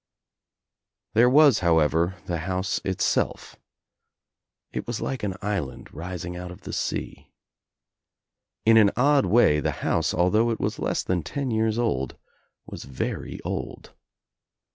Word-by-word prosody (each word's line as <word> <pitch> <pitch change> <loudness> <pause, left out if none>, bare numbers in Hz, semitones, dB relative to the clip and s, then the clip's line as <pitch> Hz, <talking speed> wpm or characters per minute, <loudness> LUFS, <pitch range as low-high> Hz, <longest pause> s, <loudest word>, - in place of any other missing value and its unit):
There 120 +3 +5
was 140 -4 +6
however 85 +1 +2
the 85 -2 -2
house 95 +3 -2
Itself. 95 -1 -1 1.2
It - - -5
was 120 -1 -3
like 135 - -3
an 100 -3 -2
island 100 -11 -4
rising 90 +1 -6
out 90 0 -6
of 90 - -11
the - - -8
sea. - - -4 1.3
In 115 0 +6
an 105 -2 +7
odd 140 +2 +4
way 100 -10 +4
the - - -1 0.2
house, 80 -2 +1
although 105 +7 +2
it 115 - -2
was - - -2
less - - -1
than 90 -2 0
ten 135 - -3
years 110 0 +1
old, 65 - -1 0.5
was - - -8
very 65 - -4
old. - - -5
95 Hz, 135 wpm, -25 LUFS, 85-115 Hz, 1.3 s, an